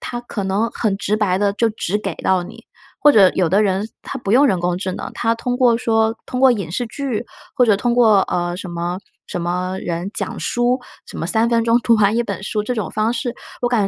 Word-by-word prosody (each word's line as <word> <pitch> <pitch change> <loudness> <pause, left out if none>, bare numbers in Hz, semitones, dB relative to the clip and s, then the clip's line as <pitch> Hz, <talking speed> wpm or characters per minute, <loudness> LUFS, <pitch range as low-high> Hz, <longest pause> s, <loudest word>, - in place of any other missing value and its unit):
它 240 - -5
可 215 -4 -5
能 200 +4 0
很 205 -4 -1
直 205 +1 -1
白 195 -4 +1
地 200 -1 +1
就 230 +1 +2
直 210 -2 -2
给 195 -5 -4
到 185 -1 +1
你， - - -12 0.4
或 295 - +7
者 200 -7 +6
有 180 -3 +2
的 200 +5 +3
人 200 +2 0
他 270 - -6
不 200 - -4
用 270 +5 +5
人 185 -8 +1
工 175 0 0
智 185 0 -3
能， - - -6
他 230 0 +1
通 245 +2 -2
过 240 -3 +3
说 225 -1 +1
通 250 - -4
过 265 -1 +6
影 195 -8 -4
视 240 +7 -2
剧 245 -1 -3 0.3
或 250 - +4
者 215 -3 +4
通 240 +2 0
过 220 -5 +5
呃， 175 0 -2
什 190 - -6
么 175 +1 -3 0.3
什 175 - -4
么 180 +2 -2
人 175 +3 -3
讲 - - -4
书， 245 +1 0 0.3
什 - - -9
么 165 - -2
3 225 +4 +2
分 230 -1 +2
钟 230 +1 +4
读 235 -1 +3
完 210 0 +3
1 235 - +2
本 200 -3 -5
书 210 +1 -2
这 245 +4 -2
种 215 - -3
方 215 +1 0
式， 245 0 -3 0.3
我 245 - +2
感 235 -4 +2
215 Hz, 255 characters per minute, -19 LUFS, 190-240 Hz, 0.4 s, 或